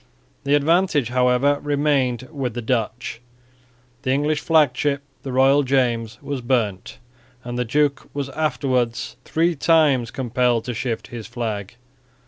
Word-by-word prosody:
The 140 +1 +4
advantage, 150 - +2
however, 125 +3 +2
remained 140 -4 0
with 130 -6 -3
the 120 - -3
Dutch. 115 0 -2 0.8
The - - -3
English 145 +3 +1
flag 150 -6 +3
ship, 140 +1 -1 0.2
the 135 - -6
Royal 135 +3 +4
James, 120 -4 0
was 140 -3 -4
burnt; 115 -7 -1 0.5
and 120 0 -5
the 125 0 -1
duke 145 +3 0
was 140 -1 -3
afterwards 130 -5 -1
three 165 +1 +1
times 145 -6 +3
compelled 125 -2 0
to 125 - -3
shift 115 0 -3
his 115 -3 -7
flag. 115 -4 -4
130 Hz, 135 wpm, -22 LUFS, 120-145 Hz, 0.8 s, The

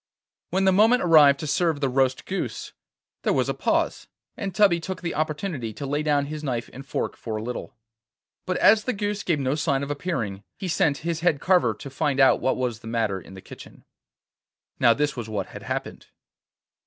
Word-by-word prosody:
When 190 +2 +1
the 190 - +5
moment 220 +6 +4
arrived 150 -5 +6
to - - -4
serve 155 +1 +1
the 140 - +1
roast 130 0 +1
goose, 195 - -4 0.5
there - - +1
was - - +1
a - - +1
pause, - - -1 0.3
and 200 -2 -4
Tubby 195 -5 +4
took 180 +1 -6
the 170 - -2
opportunity 150 - -3
to 140 - -6
lay 145 +2 -1
down 145 -2 +1
his 155 +1 -6
knife 120 -5 -3
and 135 - -9
fork 140 - -3
for 110 -2 -5
a 110 - -5
little. 125 +1 -6 0.7
But 185 - 0
as 215 0 +5
the 255 - 0
goose 205 0 -2
gave 170 -6 0
no 135 0 0
sign 145 -3 0
of 140 - -4
appearing, 115 - -3
he 190 - -5
sent 150 -4 +1
his 170 -2 -1
head 165 -4 +2
carver 175 - +3
to 140 - -9
find 140 0 -1
out 135 - +5
what 130 - +1
was 125 -3 -2
the 115 - -12
matter 110 -5 -1
in 95 - -13
the 95 - -10
kitchen. - - -13 0.9
Now 115 -1 +5
this 150 0 0
was 115 -3 -6
what 100 -3 -3
had - - -9
happened. - - -5
145 Hz, 205 wpm, -25 LUFS, 125-175 Hz, 0.9 s, arrived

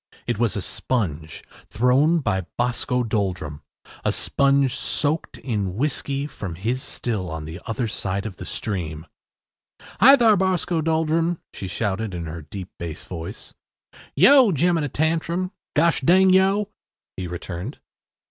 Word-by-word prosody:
It - - -2
was 115 -3 +1
a 100 - -2
sponge, 80 - -3 0.2
thrown 135 +9 +3
by 95 -8 -1
Boscoe 125 +1 0
Doldrum 95 -9 -2 0.4
a - - +2
sponge 140 -2 +2
soaked 150 +2 -1
in 100 -7 -2
whiskey 140 +2 -1
from 105 - -6
his 115 +9 -2
still 105 -10 -3
on 80 -1 -5
the 80 +4 -8
other 115 +1 -1
side 100 -2 -3
of 100 -6 -6
the - - -7
stream. 80 -6 -4 0.9
“Hi, 270 +5 +9
thar, 230 -5 +5
Boscoe 180 -3 +1
Doldrum,” 160 +1 +1 0.2
she 95 - -6
shouted 100 0 -2
in 85 -1 -4
her 80 +1 -6
deep 90 +5 -8
bass 80 -2 -6
voice. 90 +4 -8 0.6
“Yo! 250 - +7
Jemina 165 -1 +1
Tantrum. 165 +4 0 0.2
Gosh 165 +3 +3
ding 185 +2 +5
yo’!” 195 +2 +3 0.5
he 95 -1 -4
returned. 90 - -6
120 Hz, 140 wpm, -23 LUFS, -, 0.9 s, Hi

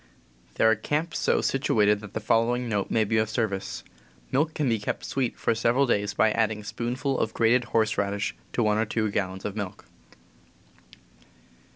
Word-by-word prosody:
There 110 - +4
are 110 - +6
camps 150 +9 -2
so, - - +2
situated 105 -6 +2
that 105 -1 -11
the - - 0
following 115 +3 +1
note 105 -3 -1
may 110 - +2
be 110 +1 0
of 110 0 0
service 110 -4 -2 0.5
:<;_^ - - -27
Milk 150 +4 +1
can 150 - 0
be 115 -3 +1
kept 100 - -4
sweet 130 -3 -2
for 115 - +1
several 115 +4 +2
days 105 -4 0
by 110 - +4
adding 110 -1 0
a - - -13
spoonful 125 +6 -2
of 110 - -1
grated 120 +2 +3
horse 110 -2 +1
radish 100 +1 -1 0.2
to 120 - +1
one 105 0 +2
or 110 - +2
two 110 -1 -1
gallons 95 -1 -3
of 105 -1 -3
milk}. 100 -4 -6
110 Hz, 190 wpm, -26 LUFS, 105-120 Hz, 0.5 s, are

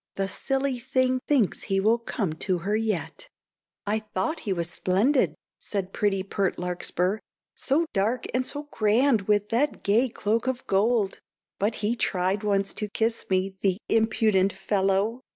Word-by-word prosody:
The 195 0 -1
silly 270 +3 -1
thing 255 0 +1
thinks 260 -10 +2
he 195 -1 0
will 220 +4 +3
come 205 -7 -2
to 180 +3 -1
her 205 +2 +1
yet." 215 -6 -2 0.6
"I 210 +2 +1
thought 215 - -3
he - - +1
was 170 -3 -1
splendid," 205 +11 +1 0.2
said 195 -2 -4
pretty 195 -2 +1
pert 195 -1 -1
Larkspur, 180 +2 -1 0.3
"So 305 +5 +1
dark, 220 +5 0
and 255 +1 +1
so 290 +3 -2
grand 220 0 +2
with 210 -1 +2
that 275 +6 0
gay 230 +6 +3
cloak 225 +2 -1
of 260 -1 -2
gold; 205 0 +1 0.4
But 210 +3 +1
he 225 +3 +1
tried 190 -3 0
once 200 -1 0
to 210 -1 -4
kiss 225 +2 -1
me, 190 0 0
the 190 -2 +2
impudent 215 -3 +2
fellow! 195 +4 0
210 Hz, 155 wpm, -26 LUFS, 195-235 Hz, 0.6 s, will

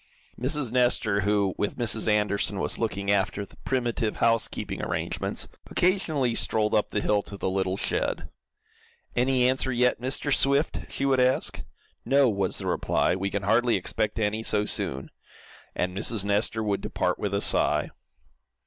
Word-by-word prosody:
Mrs. 130 -1 -1
Nestor, 120 -4 +2
who, 100 -1 +1
with 105 - -1
Mrs. 115 -2 0
Anderson, 105 -1 +1
was - - -1
looking 100 -3 -1
after 100 0 0
the - - -19
primitive 120 -4 -1
housekeeping 115 -1 0
arrangements, - - -3 0.2
occasionally 160 -9 +1
strolled 110 -2 +1
up 105 - +2
the 105 - -1
hill 105 0 +2
to 100 - -9
the 95 - -1
little 95 0 -1
shed. - - -2 0.9
"Any 125 0 +3
answer 130 0 0
yet, 125 0 +2
Mr. 135 +3 0
Swift?" 140 +4 +2
she 135 - -2
would 135 -1 +3
ask. 125 +1 +1 0.4
"No." 140 0 +4
was 100 -3 -1
the - - -4
reply. - - +1
"We 95 +1 -2
can 100 0 -3
hardly 115 +4 +3
expect 105 +3 -2
any 110 0 0
so 105 -2 +1
soon," 65 -8 -2 0.6
and 90 0 -1
Mrs. 100 0 0
Nestor 105 +2 0
would 100 -2 -1
depart, - - -1
with - - -2
a - - +1
sigh. - - +2
110 Hz, 160 wpm, -26 LUFS, 100-125 Hz, 0.9 s, No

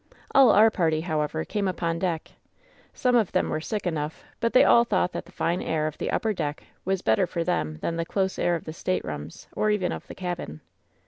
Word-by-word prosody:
All 270 -3 +7
our 220 +2 +6
party, 160 -6 +1
however, 160 -1 -1
came 205 -2 -1
upon 170 -2 -1
deck. 170 -3 -2 0.6
Some 250 -1 +1
of 225 -6 +3
them - - +1
were 155 - -1
sick 210 +4 -3
enough, 155 -3 -3 0.2
but 230 - +1
they - - +7
all 235 - +6
thought 185 -5 +1
that - - -5
the - - -16
fine 170 +2 -1
air 155 -1 -1
of 155 -1 -4
the - - -2
upper 220 -2 0
deck 150 -5 -3 0.2
was 190 0 -1
better 110 +10 +3
for 170 -1 -2
them 75 - -1
than 165 - -1
the 165 - 0
close 190 +1 -1
air 175 - +2
of 165 - -5
the 155 - -6
staterooms, 80 - -4
or 215 - +1
even 210 -4 +1
of - - -6
the - - -9
cabin. 175 - -5
175 Hz, 220 wpm, -26 LUFS, 155-195 Hz, 0.6 s, All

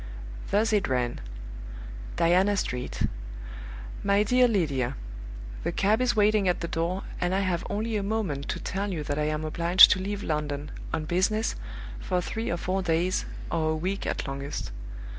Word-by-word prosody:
Thus 220 +2 +2
it 205 -2 +2
ran: 125 -2 -1 0.9
"Diana 185 +4 +3
Street. 125 -8 -2 1.0
"MY 200 +1 +4
DEAR 250 +4 +4
LYDIA 140 - 0 0.7
The - - 0
cab 215 +4 +2
is 250 -1 +2
waiting 210 -1 +4
at 180 - +1
the 170 - -2
door, 170 +4 -1 0.2
and 180 +1 +1
I 195 - +2
have 185 -3 0
only 220 +2 -1
a - - 0
moment 195 -9 -2
to - - -2
tell 200 +2 -2
you 160 -5 -3
that 145 0 -2
I 150 - +1
am 155 +1 -1
obliged 170 +3 +7
to - - +3
leave 205 +1 -3
London, 150 -1 -2 0.2
on 160 -1 -2
business, 195 +7 +1 0.5
for 180 -1 0
three 225 +5 -3
or 170 - 0
four 185 +3 -1
days, 175 +1 +1 0.3
or 160 -1 +1
a 155 - +1
week 185 +5 -2
at - - -2
longest. 140 - -4
180 Hz, 170 wpm, -27 LUFS, 155-205 Hz, 1.0 s, obliged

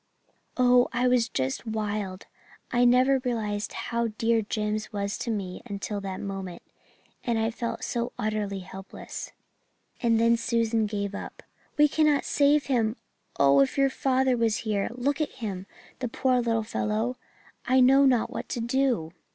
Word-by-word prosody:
"Oh, 250 -1 +5
I 250 +1 +1
was 245 -2 +3
just 130 - -2
wild! 210 -3 -3 0.5
I 245 0 +3
never 255 +2 +5
realized 220 -5 -2
how 235 0 -2
dear 225 +1 +1
Jims 215 +1 -2
was 200 -1 -2
to 240 - -3
me 195 -5 -3
until 205 0 -4
that 190 -1 -5
moment. 195 -3 -6 0.6
And 235 -3 0
I 225 +1 0
felt 230 0 -4
so 235 0 -2
utterly 205 -2 -2
helpless." 190 +1 -8 0.7
"And 230 -3 +3
then 230 0 +4
Susan 230 -1 +1
gave 200 -1 -3
up. 200 - -8 0.3
'We 300 0 +6
cannot 300 -1 +2
save 290 0 +3
him! 230 -4 +1 0.4
Oh, 140 0 +5
if 135 - +2
your 275 -1 +3
father 265 -1 +2
was 230 -2 +1
here 205 -2 0
look 275 +5 -1
at 305 - -2
him, 200 -6 -5 0.3
the 255 - -2
poor 250 +1 +1
little 230 -2 0
fellow! 220 +2 -1 0.5
I 260 +1 +4
know 265 +2 +6
not 250 -4 +3
what - - -6
to - - -3
do.' 235 -8 0
230 Hz, 160 wpm, -27 LUFS, 205-250 Hz, 0.7 s, We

